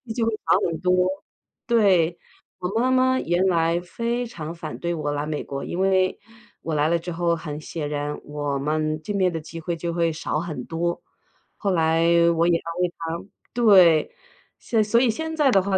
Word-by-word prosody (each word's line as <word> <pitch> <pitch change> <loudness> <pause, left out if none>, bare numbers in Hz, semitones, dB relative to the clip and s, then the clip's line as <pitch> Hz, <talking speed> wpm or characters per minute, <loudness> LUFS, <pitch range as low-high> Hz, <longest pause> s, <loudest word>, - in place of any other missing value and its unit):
就 230 - +1
会 225 - 0
少 - - +4
很 165 -1 -3
多， 180 0 +3 0.6
对。 185 -8 +3 0.4
我 180 - -2
妈 255 +1 +2
妈 260 0 +3
原 175 +3 +1
来 170 -1 +2
非 235 +7 -3
常 165 -8 -7
反 160 -2 -7
对 170 0 -2
我 150 -2 -2
来 145 0 -2
美 150 -1 -3
国， 140 0 -5
因 175 - -4
为， 190 -1 +2 0.4
我 160 -1 -3
来 150 +1 +2
了 170 0 +2
之 175 - -7
后， 170 0 +1
很 150 -2 -6
显 150 -1 -5
然 145 0 -3
我 145 -1 -3
们 155 +1 -1
见 205 - -3
面 185 -2 +2
的 165 - -2
机 165 +1 -9
会 170 +1 -2
就 170 +1 -3
会 170 -1 +1
少 155 -1 -2
很 150 -8 -5
多。 170 +1 -2 0.6
后 200 -2 -1
来 165 -1 +2 0.3
我 165 +1 +2
也 170 -1 +4
安 170 +2 -5
慰 175 -1 0
她 165 +2 -5 0.3
对， 190 -9 +5 0.5
现 225 -2 +1
所 225 +3 +3
以 250 - +3
现 320 +7 -3
在 295 -3 +3
的 195 - +5
话 190 0 +1
170 Hz, 215 characters per minute, -24 LUFS, 160-195 Hz, 0.6 s, 对